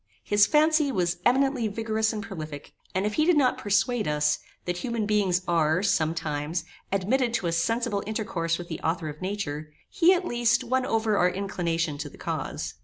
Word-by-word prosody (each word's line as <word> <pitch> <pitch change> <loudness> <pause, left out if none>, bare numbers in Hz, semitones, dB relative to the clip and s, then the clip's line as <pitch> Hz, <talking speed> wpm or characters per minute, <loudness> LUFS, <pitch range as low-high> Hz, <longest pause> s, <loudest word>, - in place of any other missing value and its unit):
His 205 0 +4
fancy 310 -1 +3
was 175 -5 0
eminently 265 -2 +2
vigorous 220 +1 0
and 215 -1 -4
prolific, 155 -9 -8 0.2
and 190 +2 +1
if 210 - -1
he 305 - +2
did 345 -2 +4
not 260 -3 +3
persuade 210 +3 +1
us, 150 0 +1 0.3
that 175 0 -2
human 230 +1 -2
beings 195 -4 +1
are, 165 +1 +2
sometimes, 160 -2 0 0.3
admitted 230 +6 +1
to 190 - -1
a 170 - +1
sensible 205 +5 0
intercourse 175 -7 -1
with 175 - -8
the 160 - -5
author 165 -1 -1
of 150 0 -9
nature, 155 -6 -4 0.2
he, 365 -3 +5
at 360 0 -2
least, 240 -4 +2
won 260 +1 0
over 220 -2 +1
our 180 - +4
inclination 170 -5 -2
to 145 -1 -4
the - - -16
cause. - - -4
200 Hz, 180 wpm, -26 LUFS, 165-235 Hz, 0.3 s, he